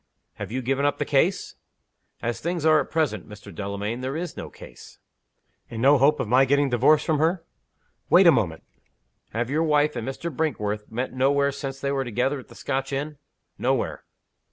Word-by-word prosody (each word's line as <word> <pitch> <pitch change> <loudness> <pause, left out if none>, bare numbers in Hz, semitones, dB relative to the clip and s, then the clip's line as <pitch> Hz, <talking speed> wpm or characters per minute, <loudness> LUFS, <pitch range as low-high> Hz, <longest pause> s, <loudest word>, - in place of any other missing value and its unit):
"Have - - -6
you 130 +2 -3
given 135 +3 0
up 145 0 +1
the - - -2
case?" - - 0 0.7
"As 120 0 -2
things 170 -1 -2
are 155 -1 +6
at 140 - -3
present, 130 - -1
Mr. 105 -2 -11
Delamayn, 100 +5 -4
there 130 +3 -3
is 175 +1 -5
no - - -7
case." - - -14 0.7
"And 115 - -6
no 135 +3 +5
hope 145 +3 +4
of - - -2
my 125 +4 +5
getting 140 0 +2
divorced 145 +6 +4
from 155 -2 +1
her?" 165 +2 +1 0.7
"Wait 185 +2 +6
a 170 - +9
moment. 95 - -1 0.7
Have 120 +3 -3
your 155 +2 +1
wife 150 -2 +2
and 120 0 -4
Mr. 145 +3 -5
Brinkworth 105 -9 -2
met 125 +3 -3
nowhere 140 +2 +2
since 135 -1 -6
they 140 - -2
were 135 -1 0
together 125 +4 -1
at 130 - -13
the - - -15
Scotch 135 0 -3
inn?" 145 +1 -4 0.4
"Nowhere." - - -1
135 Hz, 190 wpm, -24 LUFS, 120-150 Hz, 0.7 s, a